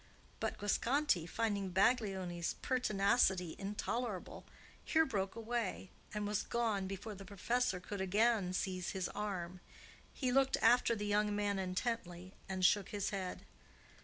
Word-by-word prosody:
But - - -2
Guasconti, 220 - +1
finding 205 -4 -1
Baglioni's 190 -4 +1
pertinacity 200 -7 +2
intolerable, 210 +1 -3 0.4
here 320 0 +3
broke 195 -7 -2
away, 230 -4 -3 0.2
and 210 -1 -2
was 210 -1 0
gone 220 -5 0
before 195 +3 -5
the 195 0 -9
professor 205 +1 0
could 195 +2 -5
again 205 0 +2
seize 185 -1 -2
his 190 -2 -2
arm. 185 -4 -4 0.5
He 255 -3 -1
looked 270 +1 +3
after 235 0 +5
the 210 -1 -3
young 210 0 +2
man 205 -1 0
intently 185 -2 -3 0.2
and 185 -1 +1
shook 200 0 +4
his 205 0 -2
head. 190 -3 -4
205 Hz, 135 wpm, -36 LUFS, 190-230 Hz, 0.5 s, after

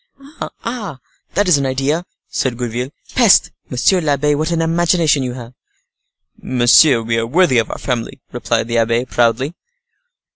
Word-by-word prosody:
"Ah! 215 - -5 0.4
that 205 0 +2
is 165 -6 +4
an 140 - -1
idea," 140 +7 -1 0.2
said 125 -3 -2
Gourville. 120 +1 -3 0.2
"Peste! 235 -6 +4 0.2
monsieur 175 +9 +2
l'abbe, 150 -1 +1
what 155 +3 -1
an 170 -1 -1
imagination 165 -2 +2
you 125 -1 -3
have!" 120 -1 -10 0.9
"Monsieur, 125 +1 +4
we 115 0 -1
are 115 - -2
worthy 155 -2 +3
of 115 - -2
our - - -5
family," 125 +1 -4
replied 115 -2 -1
the 115 0 0
abbe, 115 +2 +1
proudly. 120 +4 0
130 Hz, 150 wpm, -17 LUFS, 120-165 Hz, 0.9 s, is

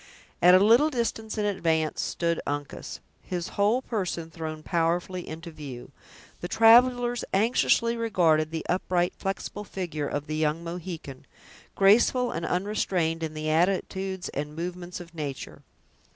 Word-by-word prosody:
At 180 +1 +8
a - - +7
little 230 +10 +5
distance 230 -4 -3
in 210 - 0
advance 165 -6 0
stood 170 -1 -1
Uncas, 145 - -5 0.2
his 175 -2 -4
whole 215 +6 +1
person 180 -8 -3
thrown 155 -2 -6
powerfully 175 +2 -1
into 165 +2 -7
view. 135 -5 -9 0.5
The 175 - -4
travelers 240 +3 +5
anxiously 230 +2 +2
regarded 170 -9 +2
the 160 0 -5
upright, 180 -1 0
flexible 195 +1 -4
figure 175 -7 -4
of 145 0 -3
the 155 - -4
young 155 +1 0
Mohican, 170 -5 -7 0.5
graceful 240 +5 +4
and 165 0 -3
unrestrained 180 -4 0
in 155 -1 -4
the 155 0 -2
attitudes 190 +2 0
and 150 +1 -5
movements 175 +1 -5
of 175 -1 -11
nature. 145 -5 -6
175 Hz, 135 wpm, -27 LUFS, 160-205 Hz, 0.5 s, At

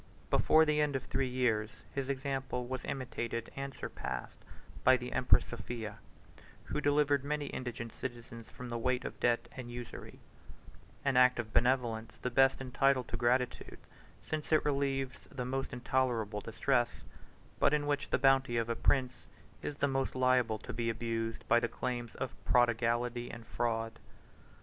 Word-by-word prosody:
Before 160 0 +5
the 150 -1 +2
end 145 -2 +1
of 135 - -1
three 135 0 -1
years, 115 -4 +1 0.2
his 135 -1 -2
example 135 -2 -2
was 130 +1 -4
imitated 120 -3 -3
and 135 0 -4
surpassed 65 - -5 0.4
by 130 0 +7
the 125 0 -6
empress 125 - +4
Sophia, 115 -2 -6 0.6
who 150 - -3
delivered 145 -1 +3
many 150 0 -1
indigent 120 -2 -5
citizens 120 -2 -7
from 125 -1 -8
the 120 0 -2
weight 125 +1 0
of - - -6
debt 120 -1 +2
and 125 -2 -7
usury: 120 -1 -8 0.9
an 135 -2 +3
act 125 0 +6
of 110 -2 -4
benevolence 115 -3 +1
the 125 - -3
best 135 +2 +4
entitled 135 0 +2
to - - -3
gratitude, 125 +1 0 0.5
since 155 0 -4
it 155 - +4
relieves 135 -2 -1
the 125 -2 -4
most 135 +1 -2
intolerable 120 -4 0
distress; - - 0 0.6
but - - +5
in 150 -1 +1
which 145 -1 -1
the - - +2
bounty 135 -2 +4
of 115 0 0
a 115 - 0
prince 130 +1 +1 0.3
is 145 - -4
the 140 - +2
most 135 -1 -1
liable 125 -3 +3
to - - -8
be 115 -1 -1
abused 115 0 -3
by 120 - +5
the 120 - 0
claims 120 -2 -4
of - - -4
prodigality 120 0 +2
and 115 -1 -9
fraud. 115 -1 -2
125 Hz, 160 wpm, -33 LUFS, 115-135 Hz, 0.9 s, by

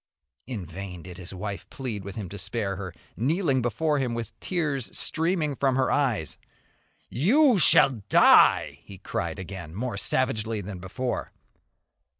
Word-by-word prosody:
In 110 -8 -5
vain 90 +1 -8
did 90 +1 -10
his 90 - -8
wife 100 +1 -6
plead 115 -7 -5
with 100 0 -8
him 105 -4 -5
to 100 - -8
spare 100 +1 -2
her, 95 -1 -6 0.2
kneeling 140 - +1
before 145 +5 0
him 125 -3 -1
with 115 -2 -5
tears 145 - -2
streaming 160 -3 0
from 135 -1 +1
her 130 -1 +2
eyes. 120 - 0 0.7
"You 240 - +4
shall 135 -6 +5
die!" - - +6
he 100 - -11
cried 85 -3 -4
again, 90 -3 -8
more 120 0 -3
savagely 115 -2 0
than 100 -1 -7
before. 120 +8 -4
115 Hz, 150 wpm, -26 LUFS, 95-135 Hz, 0.7 s, die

